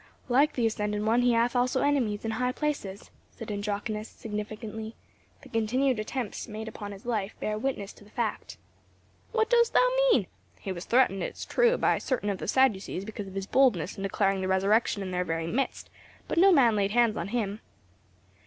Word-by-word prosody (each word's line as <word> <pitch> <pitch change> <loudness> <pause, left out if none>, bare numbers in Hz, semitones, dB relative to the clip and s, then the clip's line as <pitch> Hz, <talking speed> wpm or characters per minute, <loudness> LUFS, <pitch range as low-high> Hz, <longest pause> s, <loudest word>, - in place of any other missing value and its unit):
"Like 275 +5 +4
the 240 - 0
ascended 210 -1 -1
One, 230 +3 +3
he 245 -1 +3
hath 235 +2 +2
also 250 +1 +2
enemies 245 -8 +1
in 225 - -1
high 250 +2 -1
places;" 255 -10 -4 0.2
said 225 -2 -8
Andronicus, 210 +1 -3
significantly, 220 +1 -6 0.5
"the - - -13
continued 240 +3 +1
attempts 220 0 -4
made 220 0 -6
upon 205 -2 -7
his 200 +2 -11
life 215 -4 -2
bear 215 - -2
witness 215 -3 -3
to - - -17
the 205 - -18
fact." 225 0 -3 0.7
"What 445 0 +1
dost 470 -1 +4
thou - - +5 0.2
mean? - - +3 0.3
He 195 - -5
was 175 0 -6
threatened, 235 -6 +3
it - - -4
is - - -6
true, - - +3
by - - +2
certain 220 -6 -1
of 195 - -4
the - - -5
Sadducees 205 -7 +1
because 210 -2 -6
of 190 - -10
his 195 -1 -3
boldness 200 - +2
in - - -8
declaring 195 0 0
the 185 - -1
resurrection 200 +2 +2
in 185 - -5
their 180 0 0
very 165 -1 -2
midst, 255 +11 -2 0.4
but - - 0
no 390 +2 +7
man 250 -9 +5
laid 200 -1 +1
hands 230 0 +3
on 170 - -3
him." 210 -2 -2
220 Hz, 195 wpm, -28 LUFS, 200-250 Hz, 0.7 s, no